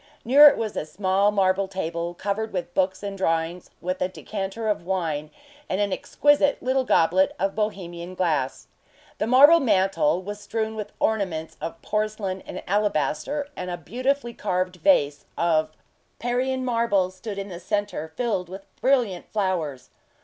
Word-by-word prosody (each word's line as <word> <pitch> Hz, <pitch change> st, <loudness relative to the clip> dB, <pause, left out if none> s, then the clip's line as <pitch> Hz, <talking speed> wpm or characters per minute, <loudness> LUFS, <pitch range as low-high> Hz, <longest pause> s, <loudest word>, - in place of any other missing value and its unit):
Near 285 Hz, +5 st, +9 dB
it -, -, +5 dB
was 220 Hz, -2 st, -3 dB
a -, -, -1 dB
small 190 Hz, +4 st, +2 dB
marble 195 Hz, -1 st, +2 dB
table, 170 Hz, -2 st, -4 dB
covered 205 Hz, +4 st, -2 dB
with 175 Hz, -1 st, -4 dB
books 190 Hz, +1 st, 0 dB
and 200 Hz, -1 st, -4 dB
drawings, 165 Hz, -1 st, -1 dB
with 185 Hz, +1 st, -3 dB
a -, -, +2 dB
decanter 195 Hz, +3 st, -5 dB
of 210 Hz, -5 st, 0 dB
wine 165 Hz, -5 st, -2 dB, 0.4 s
and 185 Hz, -, -1 dB
an 200 Hz, -2 st, +1 dB
exquisite 290 Hz, +4 st, +2 dB
little 260 Hz, +1 st, +2 dB
goblet 185 Hz, -4 st, +3 dB
of 195 Hz, +1 st, 0 dB
Bohemian 185 Hz, -4 st, -4 dB
glass. 145 Hz, -8 st, -1 dB, 0.5 s
The 215 Hz, -, 0 dB
marble 285 Hz, +7 st, +8 dB
mantel 195 Hz, -, +2 dB
was 205 Hz, +2 st, -6 dB
strewn 220 Hz, +1 st, -3 dB
with 210 Hz, -1 st, -5 dB
ornaments 185 Hz, -8 st, -1 dB
of 165 Hz, 0 st, -5 dB
porcelain 210 Hz, -3 st, -2 dB
and -, -, -6 dB
alabaster, 205 Hz, -, 0 dB
and 180 Hz, 0 st, -5 dB
a 175 Hz, -, -3 dB
beautifully 245 Hz, -, -2 dB
carved 185 Hz, -3 st, -2 dB
vase 145 Hz, -, +2 dB
of 160 Hz, -2 st, +2 dB, 0.5 s
Parian 255 Hz, +2 st, -1 dB
marble 230 Hz, -6 st, +1 dB
stood 200 Hz, +2 st, -7 dB
in 200 Hz, 0 st, -5 dB
the 175 Hz, -2 st, -7 dB
centre, 205 Hz, -4 st, -2 dB
filled 210 Hz, -8 st, -1 dB
with 195 Hz, +1 st, -9 dB, 0.2 s
brilliant 245 Hz, -9 st, +1 dB
flowers. 170 Hz, -11 st, -2 dB
195 Hz, 155 wpm, -24 LUFS, 175-220 Hz, 0.5 s, Near